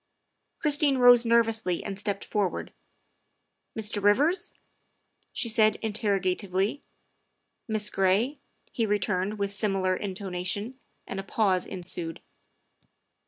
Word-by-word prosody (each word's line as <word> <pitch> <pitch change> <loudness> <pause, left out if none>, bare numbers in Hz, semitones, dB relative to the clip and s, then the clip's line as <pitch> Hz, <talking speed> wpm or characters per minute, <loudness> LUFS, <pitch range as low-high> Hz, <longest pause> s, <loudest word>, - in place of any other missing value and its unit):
Christine 290 -2 +2
rose 245 -1 +7
nervously 225 -6 +2
and 195 -1 -5
stepped 200 -1 -3
forward. 205 -4 -2 0.5
" - - -24
Mr. 210 -1 -3
Rivers?" 280 - +2 0.8
she - - 0
said 215 -1 +4
interrogatively. 200 +1 0 0.4
" - - -50
Miss 215 -2 -1
Gray?" 200 +9 +1 0.3
he 225 -2 0
returned 205 0 0
with 200 -1 -2
similar 195 -3 0
intonation, 195 +5 -3 0.3
and 195 - -5
a - - -4
pause 195 -2 +1
ensued. 175 -3 -5
205 Hz, 110 wpm, -27 LUFS, 190-225 Hz, 0.8 s, rose